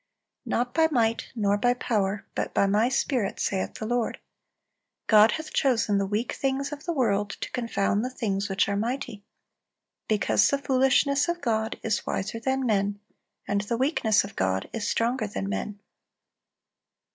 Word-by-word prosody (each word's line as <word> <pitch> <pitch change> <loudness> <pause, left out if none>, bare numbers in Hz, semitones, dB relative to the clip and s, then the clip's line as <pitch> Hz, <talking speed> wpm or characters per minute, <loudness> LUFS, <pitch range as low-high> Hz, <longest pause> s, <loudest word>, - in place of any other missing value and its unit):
"Not 245 +1 -1
by 320 -1 +4
might, 230 -5 +1
nor 205 -2 +1
by 245 +3 +3
power, 205 -4 -1
but - - -3
by - - +4
My 210 +5 +2
Spirit, 250 -6 -1
saith 190 -1 -1
the 220 - -5
Lord."(346) 240 0 -1 0.8
"God 215 0 +6
hath 315 -1 -6
chosen 230 -6 +2
the 195 - 0
weak 215 +4 -1
things 275 +1 -1
of 295 0 -8
the 345 - -1
world 205 -9 +1
to - - -5
confound 215 -3 0
the 250 - -2
things 205 -5 -2
which 195 0 +1
are 200 - -1
mighty." 220 -1 -3 0.8
"Because 215 -2 +3
the 280 - +1
foolishness 275 +2 +2
of 345 0 -1
God 220 -5 -1
is 220 -2 -1
wiser 215 +4 -2
than 265 +2 -1
men; 205 -2 0 0.5
and 200 0 +1
the 230 +3 -2
weakness 240 -5 +2
of 200 - -9
God 95 0 0
is 220 -3 -2
stronger 235 0 0
than 95 - -4
men." 150 - -4
225 Hz, 165 wpm, -26 LUFS, 205-255 Hz, 0.8 s, God